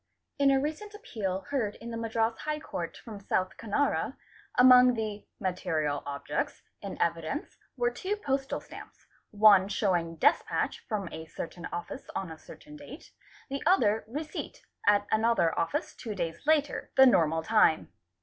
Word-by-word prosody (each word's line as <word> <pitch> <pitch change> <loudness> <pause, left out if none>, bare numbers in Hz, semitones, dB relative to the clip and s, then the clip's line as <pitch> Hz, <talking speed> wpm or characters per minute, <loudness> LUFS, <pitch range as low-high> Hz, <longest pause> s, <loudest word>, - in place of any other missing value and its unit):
In 280 -1 +5
a 270 -1 +4
recent 315 +9 -4
appeal 195 - -4
heard 230 -7 -1
in 235 +1 -9
the - - -4
Madras 225 0 0
High 305 0 -3
Court - - -5
from 215 -4 -8
$8. 190 -1 -1
Canara, 230 +6 -1 0.4
among 250 0 +8
the 215 -2 -4
"material 160 -6 -1
objects'? 140 0 -3 0.2
in - - -7
evidence 170 - -2 0.2
were 240 -1 +1
two 375 +12 -3
postal 275 -9 -2
stamps, - - -13 0.2
one. 205 -2 +6
showing 175 -5 0
despatch 160 - +1
from 205 -5 -2
a 160 0 -8
certain 170 +1 -7
office 175 0 -6
on 185 -4 -3
a 160 - -10
certain 300 0 -13
date, 290 +1 -12 0.4
the 275 - -3
other 225 - +3
receipt 300 +6 -6 0.2
at 205 0 +5
another 220 -6 +3
office 165 0 -1
two 220 -4 -6
days 165 - -4
later, 300 -2 +1
the 265 - +9
normal 165 -9 +3
time. 215 -5 +3
220 Hz, 150 wpm, -29 LUFS, 180-270 Hz, 0.4 s, the